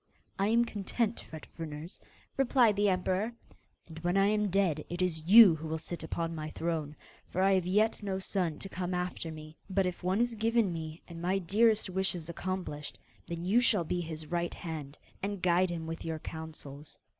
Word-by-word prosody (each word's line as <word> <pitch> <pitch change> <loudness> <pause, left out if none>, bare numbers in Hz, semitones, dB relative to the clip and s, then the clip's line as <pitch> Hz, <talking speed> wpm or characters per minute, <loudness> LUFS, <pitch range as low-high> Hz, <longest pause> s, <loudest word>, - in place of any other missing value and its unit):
'I 195 - +3
am 235 +2 +4
content, 220 +1 -2
Fet 160 -2 -10
Fruners,' 160 +1 -7 0.4
replied 250 -5 +4
the 205 0 +3
emperor, 190 +4 0 0.5
'and 160 -1 -9
when 175 +3 0
I 195 - +5
am 210 -1 +1
dead 180 -6 +1
it 175 - -4
is 165 -4 0
you 205 -3 +10
who 160 +1 -6
will 160 +1 -2
sit 170 +2 -6
upon 165 +1 -2
my 155 -1 -4
throne; 155 -2 -3 0.3
for 185 - -4
I 195 0 +5
have 185 -2 +1
yet 215 +5 +2
no 195 -2 -2
son 185 -5 -1
to 195 - -7
come 180 -1 -3
after 180 -2 -3
me. 155 0 -10
But 190 0 +2
if 180 -1 -3
one 185 +3 +1
is 240 0 +2
given 225 -3 +2
me, 160 0 -6
and 165 -1 -9
my 185 +3 +1
dearest 215 +5 +3
wish 190 +1 +1
is 170 -2 -6
accomplished, 175 -4 -4 0.3
then 170 0 -4
you 220 +7 +4
shall 210 -7 +3
be 175 +2 -1
his 160 -2 -5
right 170 +2 -2
hand, 155 -4 -6 0.2
and 200 0 -2
guide 180 +1 +3
him 165 -2 -4
with 165 +1 -5
your 160 -1 -3
counsels. 155 -2 -8
180 Hz, 200 wpm, -31 LUFS, 160-195 Hz, 0.5 s, you